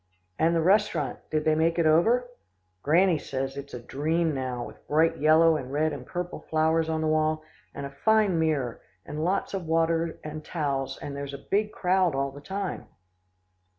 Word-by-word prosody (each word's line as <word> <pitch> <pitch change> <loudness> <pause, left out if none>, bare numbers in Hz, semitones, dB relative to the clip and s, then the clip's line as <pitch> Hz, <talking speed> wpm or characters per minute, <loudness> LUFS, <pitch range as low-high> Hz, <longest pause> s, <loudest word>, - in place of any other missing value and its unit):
"And 165 +1 +3
the 165 - +2
restaurant," 175 - +2
I - - -27
said, - - -35
"did 155 -1 -1
they 155 - +4
make 165 +2 +1
it 170 - +2
over?" 225 +11 +4 0.5
"Granny 170 +2 +3
says 135 0 -4
it's 140 -1 -7
a - - -5
dream 155 +6 -1
now, 130 -3 -3
with - - -14
bright 160 +2 +2
yellow 160 +1 +5
and 130 -3 -7
red 155 +2 +1
and 125 -3 -8
purple 175 0 -4
flowers 160 +1 +2
on 160 0 -1
the 155 - 0
wall, 155 0 +1 0.3
and 140 - -5
a 140 - -7
fine 210 +3 +2
mirror, 145 -7 0 0.2
and 150 +1 -4
lots 190 +4 0
of 185 -4 -4
water 165 0 +1
and 155 0 -6
towels, 140 -5 -2
and 140 - -6
there's 140 0 -5
a 140 - -12
big 210 +1 +2
crowd 185 -5 +1
all 135 0 -1
the 140 +1 -11
time." 195 +4 -4
155 Hz, 195 wpm, -27 LUFS, 140-170 Hz, 0.5 s, yellow